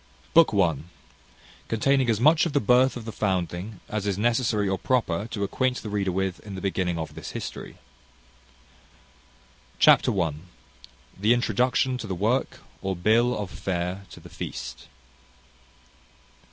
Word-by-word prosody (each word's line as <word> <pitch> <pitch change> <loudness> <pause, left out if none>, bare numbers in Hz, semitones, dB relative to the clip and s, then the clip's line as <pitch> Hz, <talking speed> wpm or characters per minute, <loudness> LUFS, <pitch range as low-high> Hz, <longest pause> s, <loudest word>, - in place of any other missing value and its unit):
BOOK 165 -1 +6
I. 85 -7 +3 0.9
CONTAINING 130 +3 +2
AS 110 -2 +2
MUCH 155 +6 +5
OF 155 - -6
THE 145 - +3
BIRTH 125 +2 +3
OF 115 - -8
THE 110 - -5
FOUNDLING 95 0 -2
AS 105 -1 -3
IS 100 -2 0
NECESSARY 115 -2 +1
OR 95 -1 -1
PROPER 110 -6 0
TO 110 -3 -4
ACQUAINT 125 +5 -1
THE 105 - -6
READER 100 -2 0
WITH 95 0 -2
IN 100 -2 -9
THE 95 - -6
BEGINNING 95 -3 -1
OF 80 -1 -5
THIS - - -8
HISTORY. - - -7 2.0
Chapter 100 - +5
i. 80 -3 +1 0.9
The 110 +4 +4
introduction 125 +2 +1
to 110 - -6
the 95 - -3
work, 110 +8 0 0.2
or 95 0 -2
bill 115 +7 +2
of 100 -3 -5
fare 90 +1 -3
to - - -12
the - - -13
feast. 60 0 -7
105 Hz, 150 wpm, -25 LUFS, 95-120 Hz, 2.0 s, BOOK